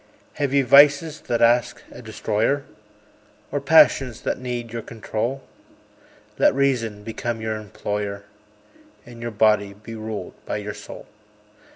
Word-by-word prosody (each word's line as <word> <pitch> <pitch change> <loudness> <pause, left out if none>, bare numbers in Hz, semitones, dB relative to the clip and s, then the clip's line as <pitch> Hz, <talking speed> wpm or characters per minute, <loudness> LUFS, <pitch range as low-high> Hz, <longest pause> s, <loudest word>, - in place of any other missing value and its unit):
Have 140 -2 +1
ye 140 0 +3
vices 145 +3 +5
that 120 -1 +1
ask 120 +1 +2
a - - -11
destroyer? 110 +4 -1 0.9
Or 145 +1 -2
passions 140 -4 +4
that - - -2
need 120 -2 -5
your 115 - -3
control? 115 +4 -4 1.0
Let - - +4
Reason 115 -7 0
become 115 +1 -4
your 110 0 -3
employer, 105 -1 -5 0.8
And 120 -1 -12
your 120 - -3
body 105 -2 +2
be 105 +3 -11
ruled 110 -1 -6
by - - -3
your - - -5
soul. - - -10
115 Hz, 135 wpm, -23 LUFS, 110-135 Hz, 1.0 s, vices